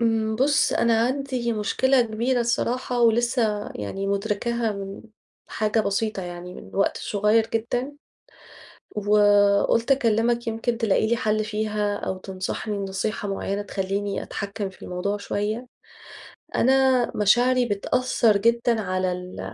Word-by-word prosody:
امم، 220 -1 +1
بص 280 +4 +3
أنا 230 -1 +3
عندي 260 -3 -2
مشكلة 255 +5 +2
كبيرة 235 +3 0
الصراحة 240 +1 -1
ولسه 230 -2 +2
يعني 150 - -4
مدركاها 210 +3 -1
من 195 -1 -7 0.5
حاجة 215 +1 0
بسيطة 205 -1 -1
يعني 175 0 -7
من - - -11
وقت 195 - +1
صغير 210 +2 +2
جدًا 245 +4 -1 1.0
وقلت 205 +3 +3
أكلمك 235 -2 +2
يمكن 230 +1 -1
تلاقي 220 -2 +2
لي 235 - +2
حل 215 -1 0
فيها 210 -1 -1
أو 190 -2 -4
تنصحني 190 +3 -4
نصيحة 200 +2 -3
معينة 195 0 -2
تخليني 200 0 -3
أتحكم 200 0 -5
في 190 - -19
الموضوع 185 +3 -3
شوية. 210 +4 -3 0.9
أنا 260 -1 +3
مشاعري 245 +4 +3
بتأثر 230 +1 +1
جدًا 235 +1 +2
على 185 -1 -1
ال 180 - -7
215 Hz, 125 wpm, -24 LUFS, 200-235 Hz, 1.0 s, بص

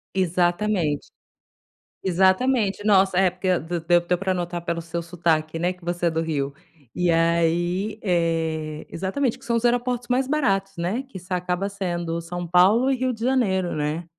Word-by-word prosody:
Exatamente. 175 -2 0 1.0
Exatamente. 195 +4 +2
Nossa, 190 -3 +4
é 190 -1 +4
porque 185 0 0
d-deu 175 +1 +1
deu 175 0 0
pra 190 -1 0
notar 175 -1 -3
pelo 170 -1 -2
seu 170 +1 -4
sotaque, 165 -2 -1
né, 175 +2 0
que 180 -2 -17
você 175 0 -1
é - - +3
do 160 0 -1
Rio, 145 -4 -2 0.4
e 180 -1 +1
aí, 170 +5 +1
eh, 160 -4 -1
exatamente 220 +8 -2
que - - -17
são 235 0 0
os 230 - -1
aeroportos 245 0 +1
mais 255 +1 +1
baratos, 195 -10 0
né 185 +9 -2
que 195 - -8
acaba 180 +2 -1
sendo 175 -4 -3
São 175 +1 -5
Paulo 195 +10 +4
e 265 - +2
Rio 255 0 0
de 225 0 -6
Janeiro, 200 -9 +1
né. 150 +3 -2
180 Hz, 165 wpm, -24 LUFS, 170-200 Hz, 1.0 s, Nossa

